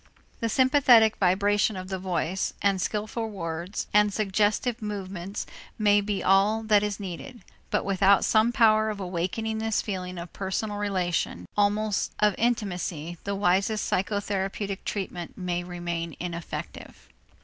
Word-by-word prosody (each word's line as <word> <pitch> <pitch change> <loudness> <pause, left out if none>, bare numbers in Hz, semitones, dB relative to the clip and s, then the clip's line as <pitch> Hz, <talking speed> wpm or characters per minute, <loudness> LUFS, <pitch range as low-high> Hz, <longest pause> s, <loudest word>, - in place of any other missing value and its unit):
The 230 - -1
sympathetic 255 -4 +5
vibration 205 +2 +2
of 185 0 -7
the 190 -1 -3
voice 180 0 -2
and 195 -2 +2
skillful 220 +3 -2
words 170 -1 -4
and 210 0 +5
suggestive 215 +4 0
movements 195 -2 -5 0.3
may 205 -1 +4
be 200 -1 -2
all 200 +4 +3
that 210 -2 +4
is 210 -1 -2
needed, 205 +6 -7 0.3
but - - 0
without 195 0 +4
some 220 +2 +4
power 220 -3 +4
of 210 -2 -4
awakening 190 +5 -2
this 220 -1 0
feeling 185 -3 -4
of 170 0 -8
personal 200 +2 -3
relation, 180 - -1
almost 210 0 +1
of 210 -1 +3
intimacy, 180 -8 -1
the 200 0 -1
wisest 195 +2 +1
psychotherapeutic 195 0 -2
treatment 180 -4 -4
may 175 -1 -2
remain 170 -2 -4
ineffective. 170 -1 -7
200 Hz, 135 wpm, -26 LUFS, 180-215 Hz, 0.3 s, sympathetic